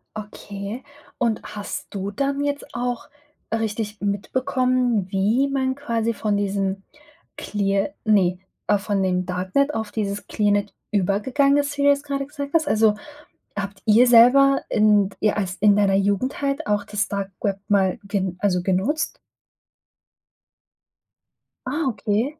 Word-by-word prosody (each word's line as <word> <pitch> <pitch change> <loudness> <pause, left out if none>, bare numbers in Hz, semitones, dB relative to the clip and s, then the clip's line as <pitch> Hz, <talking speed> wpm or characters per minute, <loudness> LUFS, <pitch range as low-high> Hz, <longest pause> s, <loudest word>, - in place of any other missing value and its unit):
Okay. 205 +2 -7 0.3
Und 230 -3 0
hast 205 -1 -6
du 200 0 -3
dann 280 +5 -1
jetzt 285 0 -2
auch 245 +1 -3 0.4
richtig 220 -1 -2
mitbekommen, 250 +1 0
wie 215 +8 +2
man 265 -1 -1
quasi 230 -4 -1
von 210 -2 -1
diesem 195 -1 -1 0.5
clear 200 0 -1
ne, 190 -5 +3 0.3
äh, 205 - +4
von 200 0 -1
dem 180 -1 0
Darknet 185 +11 0
auf 220 -2 -3
dieses 205 -2 -3
Clearnet 205 -1 0 0.2
übergegangen 215 +9 +2
ist, 290 0 -1
wie 280 - 0
du 285 - +6
das 280 0 +2
grade 275 -1 -3
gesagt 285 0 -7
hast. 315 -2 +2
Also, 220 -1 +3 0.6
habt 200 0 -5
ihr 225 +4 +6
selber 265 +4 +6
in 210 -2 +4
d - - -17
ihr 210 0 +1
als 190 -2 -2
in 205 +2 +4
deiner 200 -1 +3
Jugend 200 +8 0
halt 275 0 -1
auch 205 -1 0
das 210 0 -2
Dark 200 -1 -4
Web 200 -1 -1
mal 195 +1 +2
ge 195 -2 -2
also 185 -3 +1
genutzt? 200 - 0 2.5
Ah, 300 +5 -1
okay. 230 +6 -1
210 Hz, 140 wpm, -23 LUFS, 200-260 Hz, 2.5 s, du